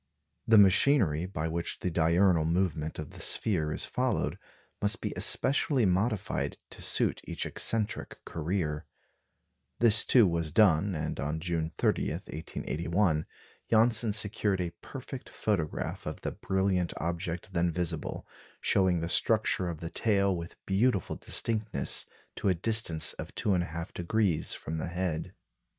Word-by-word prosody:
The 110 -1 +6
machinery 95 - +5
by 80 -4 -3
which 85 +1 -3
the 90 - -1
diurnal 85 +1 +3
movement 80 -2 -1
of 75 -2 -6
the - - -12
sphere 80 -8 0
is - - -1
followed, - - -1 0.4
must 105 0 +2
be - - -3
especially 135 -2 +2
modified 95 +2 0
to - - -9
suit - - +1
each - - -3
eccentric 110 -1 -1
career. 80 -2 -2 0.9
This, 115 -1 +7
too, 120 -4 +5
was 85 -3 -1
done, 100 -3 +4
and 75 0 -3
on 75 +3 -2
June 80 -2 -1
30, - - +1
1881, 80 +2 -2 0.4
Janssen 115 0 +3
secured 105 -2 +1
a 85 -2 -2
perfect 135 -1 -8
photograph 90 -8 -2
of - - -5
the - - -3
brilliant 95 -2 0
object 85 +3 -4
then 85 -1 +1
visible, 85 -2 -3 0.3
showing 95 -3 +2
the 85 - -2
structure 100 -1 +2
of 80 -3 -6
the 85 0 -5
tail 100 -3 +2
with 85 0 -7
beautiful 100 0 +1
distinctness 110 -11 -2 0.3
to - - +1
a 95 - +3
distance 90 -5 0
of - - -7
2 - - -1
1/2° 85 +1 0
from 80 +1 -5
the - - -3
head. 85 -2 -3
90 Hz, 135 wpm, -29 LUFS, 80-105 Hz, 0.9 s, This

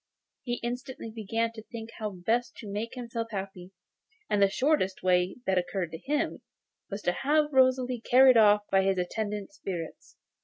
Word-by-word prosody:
He 240 -1 -2
instantly 245 -1 -5
began 225 +1 -1
to 225 -1 -10
think 225 0 -9
how 215 -1 -2
best 220 +6 -1
to 215 - -10
make 210 +4 -4
himself 235 -2 -4
happy, 190 -3 -6 0.6
and 205 - +2
the 200 - +6
shortest 255 -6 +1
way 180 0 +2
that 190 -1 +2
occurred 175 -1 -3
to 160 - -7
him 290 - -1 0.5
was 205 0 -5
to - - +2
have 295 +8 +1
Rosalie 255 -2 +3
carried 255 +2 +6
off 210 -2 +6
by 195 - +5
his 190 0 +1
attendant 205 +4 -3
spirits. 185 - -7
220 Hz, 165 wpm, -28 LUFS, 190-245 Hz, 0.6 s, the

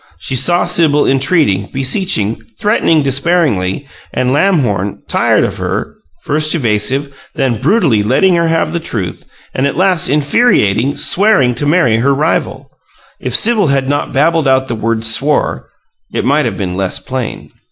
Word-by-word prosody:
She 110 +10 -4
saw 175 +8 +2
Sibyl 150 -3 +1
entreating, 135 - +1
beseeching, 130 - 0 0.2
threatening 205 -8 +1
despairingly, 140 - 0 0.2
and 125 0 -1
Lamhorn 130 - 0
tired - - +1
of - - -3
her - - -4 0.3
first 155 +2 +1
evasive, 135 +2 -2
then 120 -5 -1
brutally 150 - +2
letting 130 - +2
her 170 -1 +1
have 165 0 -1
the 170 - -1
truth; 100 - -5 0.3
and 135 +2 0
at 140 - -4
last, 185 -1 +1
infuriated, 140 - +1
"swearing" 190 -11 +2
to 145 +4 -3
marry 150 -8 +2
her 135 +4 +1
rival. 155 +4 -2 0.5
If - - -3
Sibyl 220 -6 +3
had 135 -1 0
not 145 +1 -2
babbled 155 +2 +1
out 130 0 +2
the 120 - -3
word 115 0 -2
"swore" 135 +7 +1 0.4
it - - -3
might 145 +1 +2
have 115 - -3
been 95 -3 -3
less 95 -1 -1
plain. 130 -3 -6
140 Hz, 150 wpm, -13 LUFS, 115-165 Hz, 0.5 s, Sibyl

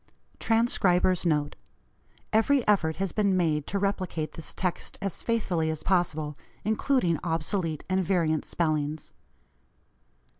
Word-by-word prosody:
TRANSCRIBER'S 185 -6 +2
NOTE: 150 -2 +1 0.8
Every 245 +5 +3
effort 160 -7 +3
has 195 -2 -2
been 200 -3 +2
made 155 -4 +1
to 200 - -2
replicate 190 -5 -2
this 165 - -7
text 180 -1 -3
as 195 -2 -3
faithfully 180 -9 0
as 155 -1 -4
possible, 155 -5 0 0.3
including 220 - +1
obsolete 165 -1 -1
and 190 0 +1
variant 165 -4 +1
spellings. 155 -2 -2
175 Hz, 115 wpm, -27 LUFS, 160-200 Hz, 0.8 s, Every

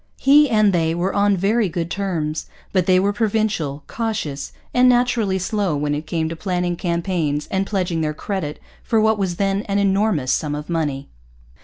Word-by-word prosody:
He 290 +1 +5
and 215 -3 +3
they 165 -1 +1
were 180 +3 -1
on 200 -1 +3
very 205 +3 +1
good 170 0 -3
terms. 165 -6 -2 0.3
But 185 -3 +2
they 185 -1 +5
were 200 +2 +1
provincial, 205 -9 -1
cautious, 210 -12 -3 0.2
and 250 0 +5
naturally 240 -5 +2
slow 190 -3 -1
when 145 0 -1
it 150 +1 -4
came 160 0 -1
to 165 - -5
planning 180 0 -1
campaigns 170 -4 -1
and 195 0 0
pledging 180 -5 -1
their 150 -1 -1
credit 160 -5 -4 0.2
for 225 - +1
what 220 0 +2
was 185 -3 -1
then 195 +1 0
an 200 - +1
enormous 195 -8 +1
sum 150 -2 -1
of 150 +3 -6
money. 145 -5 -2
185 Hz, 180 wpm, -21 LUFS, 160-205 Hz, 0.3 s, He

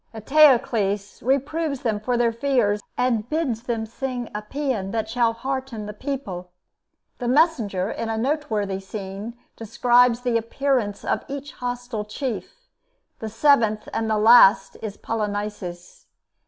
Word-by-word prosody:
Eteocles 220 -6 +3
reproves 280 +2 0
them 220 -4 0
for 245 +3 -1
their 235 -1 +2
fears, 230 -4 +1 0.2
and 240 -3 0
bids 305 -8 -1
them 230 -2 -2
sing 245 +1 -5
a 210 - -3
paean 250 -4 -3
that 220 +1 -2
shall 230 0 +2
hearten 260 -2 -4
the 210 - -6
people. 205 -8 -5 0.7
The 245 - -3
messenger, 240 - +2
in 230 - -4
a 225 - -1
noteworthy 220 -7 -1
scene, 195 +3 -7 0.2
describes 240 +2 +3
the 245 -2 +1
appearance 230 -2 -1
of - - 0
each 280 0 -6
hostile 245 -3 -4
chief. 245 +3 -5 0.6
The 220 - -5
seventh 225 -3 +3
and 225 - -1
last 220 -1 +6
is 210 -2 -6
Polynices. 205 -5 -5
230 Hz, 130 wpm, -23 LUFS, 210-260 Hz, 0.7 s, last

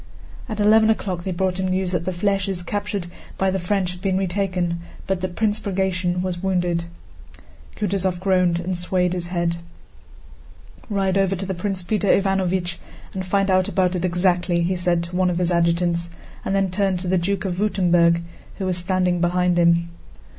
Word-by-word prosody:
At 215 -1 -4
eleven 220 +1 +5
o'clock 185 -5 -1
they 190 - -1
brought 185 +1 -1
him 190 - 0
news 185 0 0
that 175 -2 -1
the 185 - 0
flèches 195 -1 -1
captured 205 -2 -3 0.3
by 190 0 +1
the 190 - -1
French 185 0 0
had 180 0 -10
been 190 -1 +1
retaken, 180 -2 -1 0.3
but 190 -2 -1
that 185 -1 -3
Prince 215 -1 +1
Bagratión 185 -3 -1
was 180 -2 -3
wounded. 175 -3 0 0.9
Kutúzov 190 -3 -1
groaned 180 -2 +2
and 180 +1 -2
swayed 180 0 +1
his 175 -1 -3
head. 170 -1 -1 1.3
"Ride 195 -2 +1
over 195 0 +2
to 190 +1 -3
Prince 185 0 -3
Peter 205 +3 -1
Ivánovich 190 -3 +1 0.4
and 190 - -3
find 195 +1 +1
out 185 0 +3
about 185 -2 +1
it 180 - -2
exactly," 175 -1 +1
he 185 +2 0
said 175 -1 +1
to 170 +1 -7
one 185 0 +2
of 175 - -1
his 180 0 +1
adjutants, 170 0 +1 0.3
and 195 - -1
then 195 -2 +1
turned 190 -1 0
to 180 - -4
the 185 0 +2
Duke 195 +3 -1
of 180 -2 -2
Württemberg 175 -4 +3 0.3
who 195 - -3
was 185 -1 0
standing 180 -1 +1
behind 180 0 +2
him. 170 0 +3
185 Hz, 180 wpm, -22 LUFS, 175-195 Hz, 1.3 s, eleven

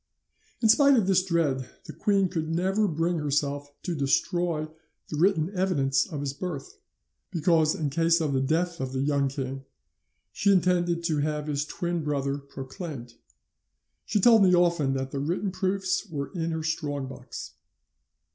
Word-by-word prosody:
"'In - - +6
spite 280 +4 +6
of 220 - +3
this 185 -1 +3
dread, 155 -8 0
the - - -9
queen 200 -2 +2
could 165 -3 -3
never 190 +5 +1
bring 165 0 0
herself 145 -1 -1
to 180 - -2
destroy 155 +2 0 0.4
the - - -4
written 170 +1 +2
evidence 150 -8 +1
of 150 -6 -5
his 140 -1 -3
birth, 185 - -6 0.5
because 160 -2 +2
in 150 -3 -2
case 165 +3 +3
of 155 -4 -1
the 130 - +1
death 170 +5 0
of 130 0 -4
the 130 - -1
young 140 -1 +1
king 135 0 -4 0.7
she 200 - +2
intended 175 -2 +2
to 160 -3 0
have 150 0 -1
his 145 -1 -1
twin 170 +1 -3
brother 140 -1 -1
proclaimed. 135 - -8 0.9
She 210 - 0
told 225 +2 +6
me 185 -2 +6
often 170 -6 +2
that 135 0 -3
the 140 - -3
written 175 +7 -1
proofs 190 +1 -1
were 140 -4 -4
in 165 -3 -2
her 160 -1 -3
strong 150 -3 -2
box. 130 - -8
160 Hz, 165 wpm, -27 LUFS, 140-180 Hz, 0.9 s, In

